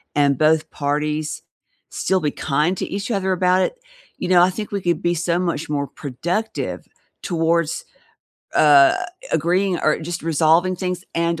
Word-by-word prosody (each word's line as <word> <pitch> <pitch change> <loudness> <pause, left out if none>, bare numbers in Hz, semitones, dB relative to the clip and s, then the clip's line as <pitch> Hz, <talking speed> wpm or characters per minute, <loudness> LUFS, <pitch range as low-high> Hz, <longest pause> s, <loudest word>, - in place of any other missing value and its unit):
and 140 -2 +3
both 155 +1 +2
parties 150 +1 -2 0.5
still 190 0 0
be 150 - 0
kind 150 +7 0
to - - -2
each 200 +4 -4
other 190 -3 0
about 185 +1 +2
it, - - -3 0.4
you - - -4
know, 180 -1 +6
I 180 - +5
think 210 +3 -6
we 200 -1 -2
could 175 -1 0
be 175 - +2
so 175 +1 0
much 165 -3 -2
more 140 -1 -1
productive 160 - -4 0.4
towards, 165 -2 0 0.7
uh, 145 -2 +6 0.4
agreeing 175 +3 +1
or 155 - +2
just 170 +2 -5
resolving 165 +3 +2
things 180 0 -3
and 170 -1 0
170 Hz, 160 wpm, -21 LUFS, 150-180 Hz, 0.7 s, know